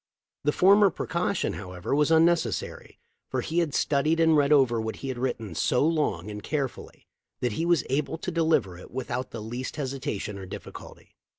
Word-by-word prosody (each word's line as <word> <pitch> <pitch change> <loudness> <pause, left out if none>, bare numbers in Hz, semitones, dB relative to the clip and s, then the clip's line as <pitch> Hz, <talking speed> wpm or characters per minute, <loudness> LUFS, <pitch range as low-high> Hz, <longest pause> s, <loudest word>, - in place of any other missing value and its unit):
The 150 - +4
former 200 +5 +6
precaution, 175 +2 -1
however, 90 +1 -5
was 150 +1 +3
unnecessary, 165 - +1 0.3
for - - -1
he 165 +2 -1
had 160 -5 0
studied 155 +3 +2
and 160 -1 +5
read 145 -1 +3
over 130 -6 +4
what 110 0 -4
he 135 - -6
had 125 -2 -4
written 115 -6 -3
so 125 - +2
long 150 - 0
and 105 0 -6
carefully 140 -2 -4 0.3
that 125 - 0
he 165 +10 -2
was 170 -6 +3
able 145 +4 -1
to 180 - -4
deliver 160 - +1
it - - -12
with 130 0 -5
out 125 +1 -2
the 110 -2 -7
least 120 +4 -5
hesitation 130 -8 -4
or 95 - -8
difficulty. - - -10
140 Hz, 185 wpm, -27 LUFS, 115-160 Hz, 0.3 s, former